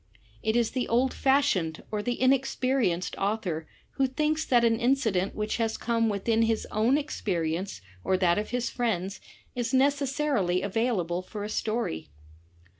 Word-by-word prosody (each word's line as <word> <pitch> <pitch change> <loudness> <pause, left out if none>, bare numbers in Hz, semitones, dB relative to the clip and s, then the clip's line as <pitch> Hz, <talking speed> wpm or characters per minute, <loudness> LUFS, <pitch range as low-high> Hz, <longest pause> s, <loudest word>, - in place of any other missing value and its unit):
It 220 +1 0
is 235 -2 +2
the 255 -1 -1
old 250 +3 +2
fashioned 265 - +1
or 210 -1 -1
the 240 +3 -2
inexperienced 255 -7 +1
author 195 -6 -2 0.3
who 270 -1 +3
thinks 305 +4 0
that 240 -2 +4
an 225 -1 +2
incident 235 -7 +1
which 215 0 -2
has 225 -1 0
come 230 -1 +1
within 220 +3 +1
his 225 -1 +1
own 230 +6 +3
ex 295 0 -4
perience 170 - -2 0.2
or 185 - +2
that 180 0 +3
of 210 - -4
his 245 0 -1
friends, 195 -5 -2 0.3
is 245 +1 -1
necessarily 275 -8 +1
available 195 -5 0
for 205 +2 -7
a 210 - -4
story. 215 - -2
225 Hz, 155 wpm, -28 LUFS, 190-255 Hz, 0.3 s, that